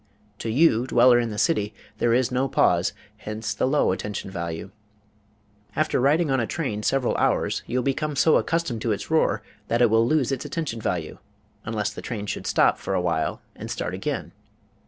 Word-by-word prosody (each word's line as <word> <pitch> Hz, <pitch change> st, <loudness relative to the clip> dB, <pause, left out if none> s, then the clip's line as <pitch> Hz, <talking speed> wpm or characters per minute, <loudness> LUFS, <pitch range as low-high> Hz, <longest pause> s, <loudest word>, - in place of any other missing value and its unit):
To 115 Hz, -, -3 dB
you, 125 Hz, -1 st, +3 dB
dweller 120 Hz, 0 st, +5 dB
in 120 Hz, -1 st, -1 dB
the 105 Hz, -, -6 dB
city, 105 Hz, -8 st, +1 dB, 0.2 s
there 120 Hz, -, +2 dB
is 125 Hz, +1 st, +2 dB
no 130 Hz, +2 st, +1 dB
pause; 90 Hz, -8 st, +2 dB, 0.3 s
hence 110 Hz, 0 st, -4 dB
the 110 Hz, -, 0 dB
low 145 Hz, -5 st, +2 dB
attention 100 Hz, 0 st, -4 dB
value. 85 Hz, +1 st, -5 dB, 1.0 s
After 155 Hz, -4 st, +1 dB
riding 150 Hz, +3 st, +3 dB
on 135 Hz, -, +2 dB
a 115 Hz, -, -1 dB
train 130 Hz, -11 st, -3 dB
several 130 Hz, +2 st, +1 dB
hours -, -, +1 dB
you 125 Hz, -, -1 dB
will 125 Hz, -, +1 dB
become 145 Hz, +3 st, -1 dB
so 160 Hz, +3 st, +5 dB
accustomed 165 Hz, -9 st, -1 dB
to 115 Hz, -2 st, +1 dB
its 100 Hz, -, -6 dB
roar 160 Hz, -, +2 dB, 0.2 s
that 115 Hz, -, +1 dB
it 120 Hz, -3 st, +4 dB
will 115 Hz, +1 st, +4 dB
lose 140 Hz, -2 st, +2 dB
its 135 Hz, -, -2 dB
attention 145 Hz, -6 st, -4 dB
value, 85 Hz, -6 st, -3 dB, 0.5 s
unless 110 Hz, -2 st, -2 dB
the -, -, -7 dB
train 105 Hz, -4 st, -5 dB
should -, -, -4 dB
stop -, -, +3 dB
for -, -, -2 dB
a -, -, +2 dB
while 85 Hz, -3 st, -1 dB
and -, -, -8 dB
start -, -, -3 dB
again. -, -, -3 dB
120 Hz, 195 wpm, -24 LUFS, 105-135 Hz, 1.0 s, dweller